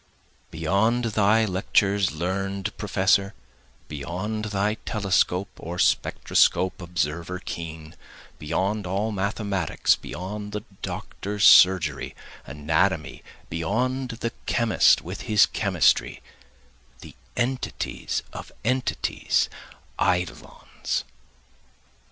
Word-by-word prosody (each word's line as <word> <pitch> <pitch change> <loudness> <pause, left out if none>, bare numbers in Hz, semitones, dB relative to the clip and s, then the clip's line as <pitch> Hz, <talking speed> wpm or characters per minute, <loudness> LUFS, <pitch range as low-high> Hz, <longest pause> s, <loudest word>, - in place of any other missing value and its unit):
Beyond 100 +9 +1
thy 110 +2 +4
lectures 100 -1 +1
learn'd 95 +5 -3
professor, 100 0 +1 0.5
Beyond 90 +9 -4
thy 105 0 0
telescope 100 -2 +1
or 85 +2 -6
spectroscope 90 +1 +2
observer 85 0 -2
keen, 80 -3 -7 0.4
beyond 95 +6 -1
all 100 +4 -1
mathematics, 100 -3 0
Beyond 105 +3 -7
the 105 0 -4 0.2
doctor's 105 0 -4
surgery, 85 -6 +5 0.3
anatomy, 80 +4 0 0.3
beyond 125 +10 -1
the 115 - -1 0.2
chemist 115 -2 +4
with - - -6
his 105 -1 +6
chemistry, - - +1 0.8
The - - -11 0.2
entities 125 +1 -2
of - - -8
entities, 130 +2 0 0.5
eidolons. 90 -1 -2
95 Hz, 85 wpm, -25 LUFS, 85-105 Hz, 0.8 s, his